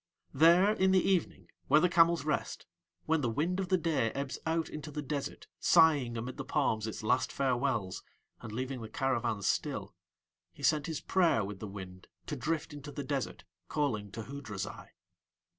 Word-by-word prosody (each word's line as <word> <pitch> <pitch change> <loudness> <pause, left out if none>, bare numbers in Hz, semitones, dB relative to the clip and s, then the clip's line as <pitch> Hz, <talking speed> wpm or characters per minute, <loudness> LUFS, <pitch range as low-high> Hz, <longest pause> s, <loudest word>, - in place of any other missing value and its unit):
There 170 +8 +6
in 190 -2 +2
the 185 - +3
evening, 190 -4 0 0.2
where 150 - +6
the 180 - +4
camels 170 -3 +4
rest, 150 -2 -2 0.4
when 160 -1 +2
the 120 - 0
wind 165 +10 0
of 190 -2 -2
the 185 - +4
day 155 -9 +1
ebbs 140 -1 -4
out 160 -1 +1
into 150 0 -7
the 150 0 -5
desert 140 0 -4
sighing 145 -8 +4
amid 120 +3 -5
the - - -4
palms 115 -7 0
its 110 - -6
last 125 +4 +2
farewells 125 -7 0 0.4
and 110 - -7
leaving 130 +2 -4
the 110 - -7
caravans 120 -6 -1
still, - - -1 0.6
he - - -13
sent 150 -2 +2
his 160 -3 -3
prayer 170 - +3
with 100 -1 -7
the 110 - -5
wind 95 -2 -9 0.2
to 150 - -4
drift 155 +4 -2
into 145 0 -8
the 145 - -5
desert 140 -1 -3 0.2
calling 110 -9 -1
to 115 - -5
Hoodrazai. 110 -7 -6
140 Hz, 175 wpm, -32 LUFS, 115-160 Hz, 0.6 s, There